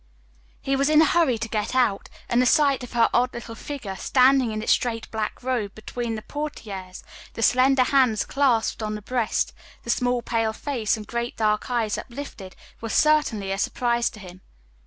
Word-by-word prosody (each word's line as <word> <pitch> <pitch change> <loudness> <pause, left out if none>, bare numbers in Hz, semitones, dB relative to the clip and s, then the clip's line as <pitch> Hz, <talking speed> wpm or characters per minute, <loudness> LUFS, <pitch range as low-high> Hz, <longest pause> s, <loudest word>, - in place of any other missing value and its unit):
He 275 - -1
was 275 +2 +2
in 305 0 +5
a 320 - +7
hurry 315 -8 +2
to 225 +1 -4
get 215 +2 -2
out, 240 -6 +1 0.2
and 240 +1 +2
the 250 - +3
sight 280 -1 +3
of 245 - -9
her 230 -1 +4
odd 250 +1 +2
little 235 -1 -7
figure, 225 -5 -6
standing 255 +2 +3
in 215 0 -4
its - - +1
straight 230 -3 0
black 220 +2 -4
robe 240 -6 -2
between 230 +1 -4
the 215 - -7
portières, 200 -11 -6 0.3
the 225 - -3
slender 255 +2 +4
hands 250 -5 +2
clasped 250 -6 +1
on 215 0 -3
the 210 - -8
breast, 240 -1 -1 0.3
the 235 - -1
small 245 0 0
pale 225 -1 0
face 230 -4 -1
and 215 - -8
great 235 +2 -4
dark 210 0 0
eyes 230 -4 0
uplifted, 235 -7 -9 0.3
was 225 -1 -4
certainly 280 -11 +2
a 195 - -2
surprise 240 +1 0
to 215 - -13
him. 185 -1 -12
235 Hz, 190 wpm, -24 LUFS, 215-260 Hz, 0.3 s, a